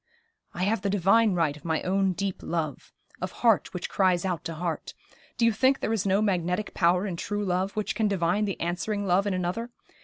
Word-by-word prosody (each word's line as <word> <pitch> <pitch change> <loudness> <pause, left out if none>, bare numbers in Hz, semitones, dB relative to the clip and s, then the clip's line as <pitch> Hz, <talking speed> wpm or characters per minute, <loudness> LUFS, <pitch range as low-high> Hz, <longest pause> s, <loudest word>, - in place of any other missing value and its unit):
'I 180 - -2
have 205 +1 +1
the 200 - -1
divine 205 +2 +3
right 160 -4 +1
of 150 - -15
my 160 -2 -1
own 190 0 +1
deep 195 0 -3
love 165 -2 -3 0.3
of - - -3
heart 225 -4 +4
which 180 - -4
cries 185 -2 +2
out 180 -3 -2
to 165 - -4
heart. 170 0 -4 0.4
Do 235 - +3
you 230 - +5
think 260 +5 +3
there 220 - -1
is 205 -2 0
no 195 +2 +3
magnetic 180 0 -1
power 180 +2 +2
in 190 -4 -3
true 205 +3 -2
love 185 +2 0
which 215 -1 -2
can 220 -2 +1
divine 195 +1 +1
the 195 - -4
answering 200 +4 -2
love 190 +2 +2
in 195 - 0
another? 185 +7 -2
190 Hz, 215 wpm, -27 LUFS, 175-205 Hz, 0.4 s, you